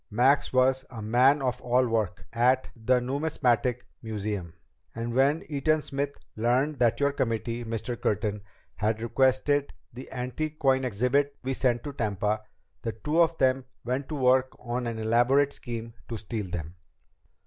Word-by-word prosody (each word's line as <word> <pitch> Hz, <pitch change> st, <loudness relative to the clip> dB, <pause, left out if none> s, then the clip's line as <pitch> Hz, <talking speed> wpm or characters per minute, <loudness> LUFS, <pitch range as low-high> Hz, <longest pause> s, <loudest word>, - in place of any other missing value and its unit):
Max 130 Hz, +6 st, +3 dB
was 130 Hz, +1 st, +3 dB
a 120 Hz, -, -8 dB
man 125 Hz, +6 st, +4 dB
of 125 Hz, -1 st, -1 dB
all 125 Hz, +1 st, +2 dB
work 105 Hz, -8 st, -1 dB
at 125 Hz, +3 st, +3 dB
the 125 Hz, +2 st, +2 dB
Numismatic 125 Hz, -2 st, 0 dB, 0.2 s
Museum, 105 Hz, -5 st, -4 dB, 0.4 s
and 115 Hz, +1 st, -3 dB
when 140 Hz, +5 st, +3 dB
Eaton 155 Hz, +1 st, +1 dB
Smith 140 Hz, 0 st, -3 dB, 0.2 s
learned 125 Hz, +6 st, +1 dB
that 120 Hz, -1 st, +3 dB
your 140 Hz, 0 st, +3 dB
committee, 115 Hz, -2 st, -2 dB
Mr. 115 Hz, +1 st, -4 dB
Curtin, 105 Hz, 0 st, 0 dB, 0.4 s
had 110 Hz, +1 st, 0 dB
requested 130 Hz, +4 st, +2 dB
that -, -, -16 dB, 0.2 s
the 130 Hz, +3 st, -9 dB
antique 130 Hz, +5 st, -3 dB
coin 135 Hz, -2 st, +2 dB
exhibit 125 Hz, +5 st, +1 dB
be 135 Hz, +1 st, -1 dB
sent 120 Hz, -2 st, +1 dB
to 145 Hz, -, -5 dB
Tampa, 105 Hz, -2 st, -1 dB, 0.4 s
the 115 Hz, -, -3 dB
two 150 Hz, +10 st, +1 dB
of 165 Hz, -1 st, +3 dB
them 130 Hz, 0 st, +2 dB, 0.2 s
went 130 Hz, +3 st, -2 dB
to 155 Hz, -, -3 dB
work 130 Hz, -1 st, +3 dB
on 120 Hz, 0 st, -3 dB
an 115 Hz, -1 st, -3 dB
elaborate 120 Hz, +6 st, +3 dB
scheme 115 Hz, -2 st, -6 dB, 0.2 s
to 115 Hz, -, -3 dB
steal 105 Hz, -1 st, -4 dB
them. 85 Hz, -2 st, -5 dB
125 Hz, 160 wpm, -27 LUFS, 115-135 Hz, 0.4 s, man